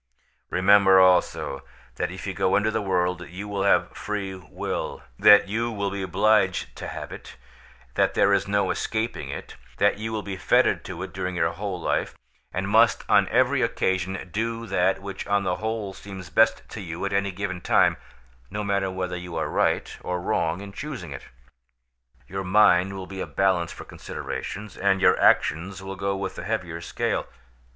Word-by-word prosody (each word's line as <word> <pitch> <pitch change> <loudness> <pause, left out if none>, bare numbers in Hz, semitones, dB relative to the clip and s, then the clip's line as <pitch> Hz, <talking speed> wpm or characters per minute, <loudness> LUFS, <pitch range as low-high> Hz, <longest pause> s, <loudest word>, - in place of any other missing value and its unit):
"Remember 95 0 +6
also, 90 -6 +3 0.4
that - - -1
if - - -8
you - - -3
go 95 - +1
into 105 +1 +2
the 110 - -1
world 90 -2 -1
you 95 +4 -7
will 100 -1 -3
have 90 -3 +2
free 100 -2 -4
will; 90 -3 -5 0.2
that 105 -1 +7
you 115 +4 -1
will 100 -3 -2
be 100 0 -4
obliged 95 +1 +2
to - - -6
have - - -7
it; - - -10 0.6
that - - +1
there 100 - +4
is 100 0 +1
no 100 0 +1
escaping 115 +1 -2
it; - - -7 0.2
that 100 0 +2
you 110 +1 -4
will 110 -2 -3
be 100 -1 -5
fettered - - +3
to - - -6
it - - -8
during 90 0 -3
your 80 -1 +1
whole 95 +1 -4
life, - - -1 0.3
and 95 +1 -2
must 110 +3 +4
on 100 -1 +4
every 130 +3 +2
occasion 95 -5 -1
do 115 +1 -2
that 95 -1 +1
which 100 -1 -6
on 100 0 +2
the 90 -1 -1
whole 110 -1 -3
seems 95 -2 -10
best - - +3
to 110 - -7
you 85 0 -5
at 100 - -2
any 100 0 +1
given 95 -1 -4
time, - - +3 0.5
no 105 +1 -3
matter 100 -1 0
whether 95 -1 -3
you 90 -1 -7
are 80 - -1
right - - 0
or 90 0 -2
wrong 85 0 -1
in 100 -1 -9
choosing 125 - -6
it. 70 - -8 1.0
Your 95 +1 -4
mind 95 -1 +4
will 95 -1 -6
be 95 0 -7
a - - -3
balance 95 -3 +1
for - - -9
considerations, 105 -1 -6
and 95 0 +2
your - - +4
action 85 +5 +3
will 95 0 -6
go 100 0 -1
with 95 0 -4
the - - -5
heavier 90 -5 -3
scale. - - -2
95 Hz, 185 wpm, -25 LUFS, 90-105 Hz, 1.0 s, that